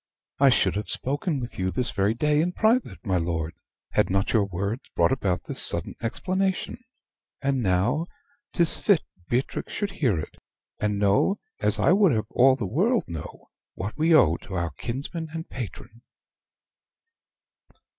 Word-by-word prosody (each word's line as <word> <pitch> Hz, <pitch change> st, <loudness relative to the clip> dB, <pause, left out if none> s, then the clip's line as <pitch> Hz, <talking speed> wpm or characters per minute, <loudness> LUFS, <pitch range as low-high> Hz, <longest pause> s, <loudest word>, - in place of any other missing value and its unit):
I 140 Hz, 0 st, +6 dB
should 125 Hz, -, +2 dB
have 105 Hz, -, -4 dB
spoken 145 Hz, +3 st, -1 dB
with 120 Hz, -4 st, -7 dB
you 95 Hz, 0 st, 0 dB
this 110 Hz, +6 st, -2 dB
very 100 Hz, +3 st, +1 dB
day 150 Hz, +4 st, +2 dB
in 175 Hz, +2 st, -1 dB
private, 225 Hz, +5 st, +1 dB
my 95 Hz, -3 st, +1 dB
lord, 85 Hz, -1 st, -2 dB, 0.4 s
had -, -, +2 dB
not 95 Hz, +2 st, 0 dB
your 110 Hz, -4 st, +3 dB
words 100 Hz, +6 st, -3 dB
brought -, -, +3 dB
about 100 Hz, -9 st, 0 dB
this -, -, -1 dB
sudden -, -, +4 dB
explanation 190 Hz, -, -2 dB, 0.6 s
and 135 Hz, -2 st, 0 dB
now 105 Hz, -, +1 dB, 0.4 s
'tis 170 Hz, -3 st, +2 dB
fit 200 Hz, -7 st, +3 dB, 0.3 s
Beatrix 125 Hz, +3 st, -2 dB
should 205 Hz, -2 st, -2 dB
hear 120 Hz, -, 0 dB
it; 75 Hz, -, -8 dB, 0.4 s
and 105 Hz, -1 st, 0 dB
know, 105 Hz, -, +2 dB, 0.2 s
as -, -, +2 dB
I -, -, +3 dB
would 195 Hz, -5 st, +5 dB
have 110 Hz, -1 st, 0 dB
all 130 Hz, +1 st, +5 dB
the 120 Hz, -6 st, -4 dB
world 200 Hz, -, +1 dB
know, 80 Hz, -4 st, -9 dB, 0.2 s
what 100 Hz, +3 st, -5 dB
we 160 Hz, +2 st, +1 dB
owe 85 Hz, -, +5 dB
to 95 Hz, -, -9 dB
our 85 Hz, -2 st, -1 dB
kinsman 140 Hz, -, -5 dB
and 165 Hz, 0 st, -5 dB
patron." 115 Hz, -1 st, -8 dB
120 Hz, 160 wpm, -25 LUFS, 100-160 Hz, 0.6 s, I